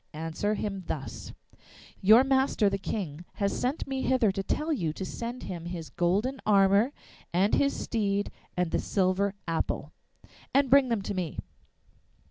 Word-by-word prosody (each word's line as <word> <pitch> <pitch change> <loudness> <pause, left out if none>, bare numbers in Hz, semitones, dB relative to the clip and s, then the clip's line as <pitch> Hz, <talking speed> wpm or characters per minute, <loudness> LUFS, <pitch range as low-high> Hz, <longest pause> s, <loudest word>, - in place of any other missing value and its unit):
'' - - -44
Answer 165 +7 -2
him 195 -3 -3
thus: 140 -4 -5 0.7
'Your 220 +6 +7
master 265 -6 +2
the 195 - -1
King 175 -6 -4
has 200 -2 -1
sent 260 +5 -1
me 270 -1 -3
hither 255 -6 +3
to 195 0 -3
tell 305 +11 -1
you 165 - -1
to 190 - -5
send 235 +5 -5
him 170 -2 -6
his 170 -5 -6
golden 205 - 0
armour 200 +4 +4 0.4
and 190 +5 +2
his 280 0 +2
steed 205 -3 -1 0.3
and 180 -2 0
the - - +1
silver 195 +1 +1
apple.'' 165 -1 -2 0.6
And 275 -2 +4
bring 275 -2 +6
them 225 -4 0
to 205 - -3
me. 180 -5 -3
200 Hz, 160 wpm, -28 LUFS, 180-245 Hz, 0.7 s, Your